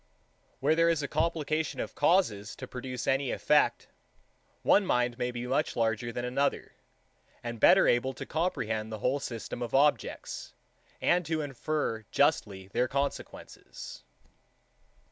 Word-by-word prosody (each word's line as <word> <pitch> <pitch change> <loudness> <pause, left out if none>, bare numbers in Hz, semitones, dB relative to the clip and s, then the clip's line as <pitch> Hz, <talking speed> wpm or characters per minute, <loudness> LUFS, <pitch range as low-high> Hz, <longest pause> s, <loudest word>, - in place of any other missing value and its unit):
2. - - -37
Where 145 +3 +4
there 165 +1 +4
is 165 -3 +1
a - - -1
complication 155 0 -1
of - - -4
causes 145 - +2
to 130 - -7
produce 125 0 -5
any 135 0 +1
effect, - - +2 0.8
one 205 - +5
mind 125 -8 0
may 125 - 0
be 120 0 -5
much 135 +5 0
larger 115 0 0
than 120 +1 -3
another, 135 +3 -1 0.7
and 120 -1 -5
better - - +6
able 120 +2 +2
to - - -6
comprehend 110 -10 -2
the 110 - -4
whole 130 +6 0
system 120 -2 -6
of 120 0 -2
objects, 145 +2 0 0.5
and 180 +1 +3
to 160 -1 0
infer 145 -4 -2
justly 95 -2 +1
their 125 +5 +1
consequences. 140 +2 -5
130 Hz, 145 wpm, -29 LUFS, 120-155 Hz, 0.8 s, better